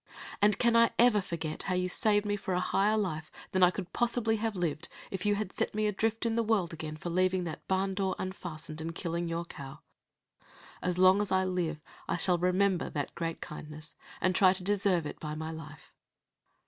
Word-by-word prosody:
And 205 0 +5
can 235 -1 +3
I 230 0 +6
ever 235 -3 +5
forget 165 -4 -4
how 185 - -1
you 180 0 +1
saved 205 +3 +3
me 205 0 0
for 190 -2 -3
a - - +2
higher 205 +3 +2
life 160 -7 -2 0.2
than 185 - +1
I 180 - +8
could 180 -1 -6
possibly 235 -2 +1
have 220 -1 -2
lived 170 -2 -2 0.2
if 190 +2 -3
you 205 - +3
had 205 -2 -3
set - - -1
me 215 0 +1
adrift 220 +2 0
in 230 - +1
the 230 - +2
world 210 -7 +1
again 155 -1 -6
for 170 +2 -5
leaving 185 +1 +2
that 165 -3 -6
barn 190 0 +1
door 190 -1 -1
unfastened, 160 -4 -6
and 165 +1 -5
killing 170 -1 -2
your 165 +1 -2
cow? 140 -3 -10 1.0
As 180 -1 -1
long 185 +2 +6
as 205 - -2
I 190 0 +3
live, 170 -4 -2 0.3
I - - +1
shall 175 0 +3
remember 180 +1 +2
that 145 -2 -3
great 165 -1 -4
kindness, 150 +1 -8 0.2
and 185 -1 +1
shall - - +2
try 185 - +6
to 190 -1 -7
deserve 195 -4 +1
it - - -6
by 150 -1 -5
my 160 +1 -4
life." 155 -1 -10
185 Hz, 210 wpm, -30 LUFS, 165-205 Hz, 1.0 s, I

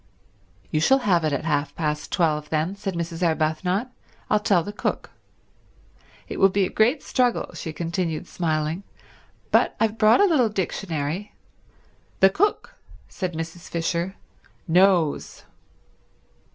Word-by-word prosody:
"You 155 - +1
shall 265 +12 +5
have 175 -5 +3
it 155 - +1
at 140 +2 -2
half 145 -2 -1
past 150 -2 -2
twelve 155 -4 0
then," 160 +5 -1
said 195 -2 -4
Mrs. 170 0 -4
Arbuthnot. 175 +7 0 0.4
"I'll 210 - +4
tell 195 -5 +2
the 205 - -6
cook. - - -3 1.2
It - - -6
will 195 - +6
be 195 0 +1
a - - -5
great 245 +7 +2
struggle," 250 -2 0
she 160 - -6
continued, 170 0 -3
smiling, 160 0 -2 0.7
"but - - +3
I've 225 0 0
brought 215 0 +6
a 405 - +6
little 285 - +3
dictionary—" 180 -2 -3 0.8
"The 190 0 +6
cook," 410 - 0 0.4
said 185 -4 -4
Mrs. 165 +2 -6
Fisher, 170 +2 -2 0.5
"knows." 180 -3 +2
175 Hz, 135 wpm, -24 LUFS, 160-200 Hz, 1.2 s, will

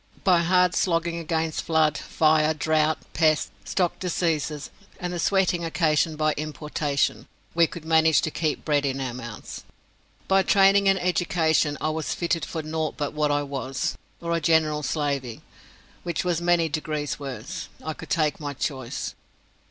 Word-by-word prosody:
By 180 -3 +5
hard 180 +1 +3
slogging 170 -1 0
against 160 -1 -1
flood, 160 -2 +2
fire, 155 0 +2
drought, 155 +1 +2 0.2
pests, 155 -2 +2
stock 180 -3 0
diseases, 160 -5 -1 0.3
and 180 0 -3
the 175 - -3
sweating 185 -2 +2
occasioned 160 -1 +1
by 155 0 +2
importation, 150 -1 -2 0.3
we 170 0 +4
could 160 0 -9
manage 160 -1 +4
to 155 - -2
keep 155 -1 -2
bread 145 -2 +2
in 135 -1 -1
our 130 -3 -3
mouths. 120 -4 -8 0.6
By 195 0 +4
training 195 0 +5
and 195 - +4
education 165 -4 +1
I 155 - 0
was 155 0 -2
fitted 170 -3 -1
for 160 - -5
nought 155 0 -3
but 145 0 -2
what 150 -1 +1
I 145 0 +1
was, 135 -2 -3 0.3
or 170 0 -1
a 165 - -1
general 155 -1 +2
slavey, 140 -5 -2 0.6
which 170 0 -3
was 175 -2 0
many 170 -1 +3
degrees 155 -2 -3
worse. 140 - -6 0.2
I 155 - -2
could - - -11
take 155 -3 +1
my 145 -2 -4
choice. 130 -2 -4
155 Hz, 160 wpm, -25 LUFS, 150-170 Hz, 0.6 s, By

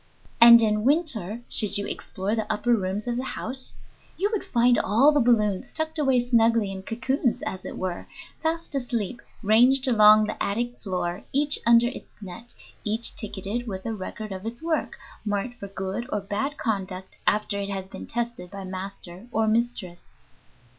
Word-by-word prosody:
"] - - -29
And 235 0 +10
in 210 -1 +1
winter, 240 - +1
should 210 -2 +2
you 200 - -2
explore 195 +3 -4
the 220 -1 -2
upper 240 +3 +1
rooms 200 -1 -1
of 240 -1 -2
the 255 - -2
house, 260 0 -5 0.4
you 405 +4 0
would 425 - -1
find 240 0 +3
all 235 +10 +4
the 295 - +2
balloons 215 -6 +2
tucked 315 0 -3
away 265 -4 +3
snugly 230 -3 +3
in 190 -1 -6
cocoons, 250 +4 -1
as 185 -1 -5
it - - -6
were, 185 -2 -4 0.3
fast 325 0 -2
asleep, 240 -4 -3 0.2
ranged 250 +6 +5
along 215 -3 +7
the - - -5
attic 240 +4 -2
floor, 180 -1 -3
each 290 +1 +2
under 235 0 +6
its 245 - -7
net, 220 +4 -9 0.3
each 220 +2 +1
ticketed 210 +3 -4
with 190 -3 -5
a 225 - -2
record 215 +1 -6
of 190 0 -6
its 235 +6 -6
work, 325 -1 -1 0.3
marked 210 +4 -3
for 200 - -6
good 195 +5 -5
or 210 - 0
bad 210 +9 -3
conduct 190 -4 -4
after 210 -1 +1
it 200 0 -3
has 190 -1 -4
been - - -9
tested 235 -6 -4
by 200 0 -8
master 185 +1 -8
or 220 -1 +1
mistress. 215 -6 -2
220 Hz, 175 wpm, -25 LUFS, 195-245 Hz, 0.4 s, And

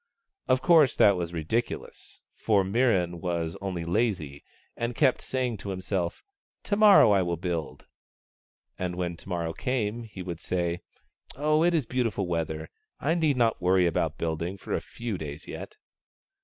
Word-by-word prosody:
Of 130 0 +2
course, 155 -3 +5
that 100 -2 +6
was 85 -2 -3
ridiculous, 85 +9 -4
for 105 -3 +2
Mirran 95 -5 +1
was 85 -2 -2
only 90 -4 -3
lazy, 85 -7 -1 0.3
and 120 0 -3
kept 130 -2 +3
say 130 -1 -1
ing 120 -3 -3
to 100 - -7
himself, 95 -2 -3 0.2
" - - -62
To 205 - 0
morrow 200 - +7
I 100 -2 +4
will 85 -1 -1
build 85 -2 -4 0.5
"; - - -45
and 90 -1 -2
when 90 -1 -2
to 95 - -12
morrow 85 -2 -2
came, 120 -1 -2
he 105 -5 -8
would 85 -2 -6
say, 85 -1 -1 0.5
"Oh, 155 +3 +2
it 175 0 +3
is 150 -6 +1
beautiful 115 -5 -1
weather; 80 -2 -2 0.3
I 150 +4 +1
need 155 -5 +2
not 115 -4 +2
worry 90 0 +4
about 85 - 0
building 85 +3 -2
for - - -6
a - - 0
few 115 -6 -5
days 75 -1 -7
yet." - - -8
95 Hz, 170 wpm, -27 LUFS, 85-120 Hz, 0.5 s, morrow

